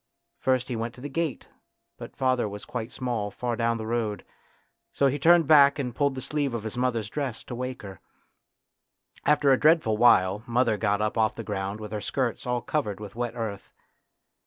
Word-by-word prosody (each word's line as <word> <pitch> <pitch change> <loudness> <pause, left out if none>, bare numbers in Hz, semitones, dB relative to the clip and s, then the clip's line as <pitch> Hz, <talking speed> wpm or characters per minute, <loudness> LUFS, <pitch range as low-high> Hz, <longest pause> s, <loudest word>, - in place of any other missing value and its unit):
First 130 -1 +1
he 125 - -3
went 115 +1 -4
to 125 - -13
the 145 - -5
gate, 165 0 -3 0.5
but - - -9
father 130 -4 +1
was 100 0 -8
quite 120 -1 -5
small 120 -5 -3
far 120 +4 -3
down 115 0 0
the 110 - -5
road, 110 -3 -2 0.7
so 140 - +1
he 140 +2 +1
turned 170 +3 +5
back 140 -2 +6
and 125 -4 -3
pulled 140 +2 0
the 130 - -5
sleeve 145 -5 -1
of 115 - -4
his 110 +1 -5
mother's 120 -4 0
dress, 135 -1 -4
to - - -8
wake 125 0 -5
her. 95 -3 -9 1.3
After 145 -1 +4
a 130 - +4
dreadful 155 -9 +4
while 105 -4 +4
mother 120 -1 +2
got 105 0 0
up 110 +1 -1
off 110 -1 +2
the - - -6
ground 100 0 -4
with 105 -1 -8
her 105 -1 -3
skirt 130 +1 -2
all 125 -1 -1
covered 105 -11 -2
with 105 -2 -8
wet 120 -1 -3
earth. 110 -4 -5
120 Hz, 200 wpm, -26 LUFS, 110-135 Hz, 1.3 s, back